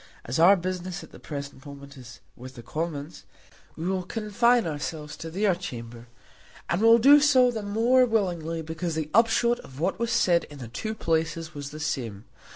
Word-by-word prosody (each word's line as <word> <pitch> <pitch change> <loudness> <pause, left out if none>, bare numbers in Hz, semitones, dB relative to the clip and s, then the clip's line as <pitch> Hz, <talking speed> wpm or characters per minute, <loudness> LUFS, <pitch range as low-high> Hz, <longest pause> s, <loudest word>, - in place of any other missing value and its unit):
As 125 +6 -2
our 180 +5 +7
business 185 0 -4
at - - -14
the - - -13
present 140 -2 -7
moment 140 0 -11
is 125 -2 -13
with 130 +1 -11
the 120 - -10
Commons, 155 +1 -5 0.5
we 165 - -6
will 190 0 0
confine 225 +5 +1
ourselves 150 -1 -5
to 165 - -7
their 195 +3 +1
chamber, 120 -9 -8 0.6
and 175 - +1
will 230 +1 +7
do 280 +5 +7
so 260 -4 +4
the 225 -2 -4
more 230 +5 +3
willingly 170 -7 -1
because 160 +1 -4
the 155 -1 -3
upshot 235 +2 +3
of 130 +1 -13
what 180 +4 -1
was 235 0 -1
said 180 -7 +3
in 145 - -13
the 125 -4 -8
two 215 - -4
places 165 -2 -2
was 145 -1 -6
the 155 - -9
same. 115 -9 -4
165 Hz, 185 wpm, -26 LUFS, 145-215 Hz, 0.6 s, our